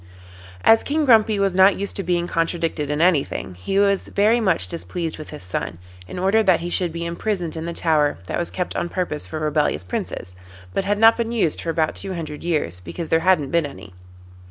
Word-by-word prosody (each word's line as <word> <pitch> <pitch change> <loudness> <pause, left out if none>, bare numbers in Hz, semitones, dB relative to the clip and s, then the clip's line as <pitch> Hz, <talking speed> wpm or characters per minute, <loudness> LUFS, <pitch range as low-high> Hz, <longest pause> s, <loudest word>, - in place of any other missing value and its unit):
As 225 - +6
King 300 +1 0
Grumpy 220 -4 +5
was 195 -2 +1
not 190 +2 +5
used 200 - -3
to - - -1
being 175 -1 0
contradicted 165 -3 -1
in 150 +1 -1
anything, 165 - +1
he 90 - -3
was 200 -1 +2
very 215 +4 +3
much 185 -7 +2
displeased 170 -1 -4
with 155 - -8
his 150 - -9
son, 90 -1 -4 0.3
and 180 - -6
ordered 200 +4 +2
that 180 -3 +4
he 175 - -4
should 175 -2 +1
be 170 +1 -5
imprisoned 170 -1 -3
in 160 0 -5
the 170 - -3
tower 155 -4 +1
that - - -3
was 175 - -1
kept 180 - -4
on 175 - -2
purpose 170 -5 -3
for 155 - -5
rebellious 150 - 0
Princes, 90 0 -5 0.4
but 195 - -1
had 205 +1 +1
not 225 +1 +6
been 230 -1 -2
used 210 -10 0
for 170 - -4
about 160 -1 0
two 190 -1 -5
hundred 155 -3 -6
years, 150 - -1
because 160 - -7
there 160 - +3
had 185 +1 +4
not 140 -2 -5
been 170 -3 +2
any. 135 -9 -12
170 Hz, 220 wpm, -22 LUFS, 155-195 Hz, 0.4 s, As